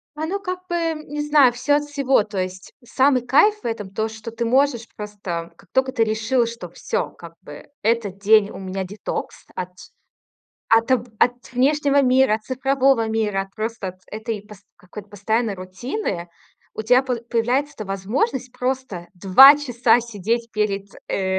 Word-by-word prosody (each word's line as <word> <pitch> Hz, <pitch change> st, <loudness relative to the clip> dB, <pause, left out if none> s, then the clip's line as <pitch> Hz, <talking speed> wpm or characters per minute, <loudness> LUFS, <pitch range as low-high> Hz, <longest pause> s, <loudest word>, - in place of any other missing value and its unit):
Оно 320 Hz, +6 st, -2 dB
как 365 Hz, -2 st, -4 dB
бы, 345 Hz, -, -1 dB
м, 330 Hz, -2 st, -1 dB
не 295 Hz, +1 st, -4 dB
знаю, 295 Hz, -4 st, +5 dB
всё 270 Hz, +4 st, +1 dB
от 295 Hz, 0 st, 0 dB
всего, 275 Hz, -6 st, +2 dB
то 205 Hz, -2 st, -8 dB
есть 185 Hz, 0 st, -5 dB
самый 260 Hz, 0 st, +2 dB
кайф 415 Hz, +12 st, +4 dB
в -, -, -15 dB
этом 225 Hz, -4 st, -3 dB
то, 215 Hz, +3 st, -2 dB
что 220 Hz, +1 st, -8 dB
ты 230 Hz, +1 st, -3 dB
можешь 250 Hz, -1 st, +2 dB
просто, 195 Hz, -5 st, -6 dB
как 195 Hz, -, -22 dB
только 260 Hz, 0 st, +1 dB
ты 230 Hz, -4 st, +2 dB
решила, 225 Hz, +3 st, +1 dB
что 230 Hz, -6 st, -7 dB
всё, 170 Hz, -, -3 dB
как 170 Hz, -1 st, -13 dB
бы 145 Hz, 0 st, -12 dB
этот 215 Hz, -4 st, 0 dB
день 210 Hz, 0 st, +4 dB
у -, -, -9 dB
меня 190 Hz, 0 st, -4 dB
детокс 200 Hz, +2 st, -6 dB
от 185 Hz, 0 st, -4 dB, 1.0 s
от 230 Hz, +2 st, +3 dB
от, 255 Hz, -2 st, +4 dB, 0.2 s
э, -, -, +7 dB, 0.2 s
внешнего 280 Hz, +2 st, +3 dB
мира, 255 Hz, -3 st, +4 dB
от 220 Hz, -, -4 dB
цифрового 265 Hz, -1 st, +1 dB
мира, 215 Hz, -3 st, 0 dB
от 195 Hz, +1 st, -15 dB
просто 215 Hz, -4 st, -4 dB
этой 220 Hz, 0 st, -4 dB, 0.4 s
какой-то 200 Hz, +3 st, -11 dB
пост -, -, -33 dB
постоянной 220 Hz, +2 st, -1 dB
рутины, 185 Hz, -, -5 dB, 0.5 s
у 220 Hz, -, -4 dB
тебя 250 Hz, +4 st, +4 dB
по 255 Hz, -2 st, -1 dB
появляется 240 Hz, +5 st, -1 dB
эта 215 Hz, -, -7 dB
возможность 235 Hz, -, -2 dB
просто 250 Hz, -9 st, -3 dB
2 205 Hz, +11 st, +8 dB
часа 245 Hz, -4 st, +2 dB
сидеть 230 Hz, +1 st, -3 dB
перед, 200 Hz, -2 st, -1 dB, 0.2 s
э, 190 Hz, -1 st, 0 dB
230 Hz, 170 wpm, -22 LUFS, 200-265 Hz, 1.0 s, 2